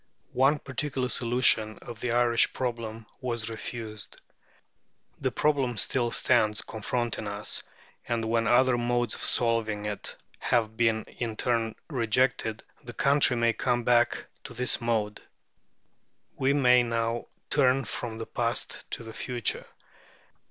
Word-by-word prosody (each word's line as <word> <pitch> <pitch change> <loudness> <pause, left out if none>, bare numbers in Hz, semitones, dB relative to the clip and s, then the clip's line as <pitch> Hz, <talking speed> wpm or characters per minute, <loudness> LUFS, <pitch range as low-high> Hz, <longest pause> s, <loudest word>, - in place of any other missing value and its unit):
One 135 +4 +4
particular 135 -2 -2
solution 115 -3 +3
of 120 -2 -9
the 125 - -2
Irish 120 -1 +3
problem 115 -3 -4
was 115 -3 -3
refused. 110 -2 -7 1.0
The - - 0
problem 135 -6 +1
still 120 +4 +1
stands 105 -2 +2
confronting 115 0 -3
us, 105 0 -2 0.5
and 115 -1 -1
when 115 0 +1
other 125 0 +4
modes 120 -1 0
of - - -4
solving 110 -3 +2
it 105 -1 -4 0.2
have 110 -3 +1
been 115 -1 +2
in 115 -3 -5
turn 115 -3 0
rejected, 115 -4 0 0.2
the 120 - -8
country 140 +1 +3
may 115 -1 +2
come 120 -1 0
back 120 0 +2 0.2
to - - -9
this 125 0 +1
mode. 110 -3 -1 1.1
We 135 +1 +2
may 125 -3 +5
now 115 0 -1 0.2
turn 135 -2 +3
from 115 -2 -5
the 115 - -5
past 115 -1 -3
to - - -5
the 115 0 -9
future. 120 0 -3
120 Hz, 130 wpm, -28 LUFS, 110-125 Hz, 1.1 s, may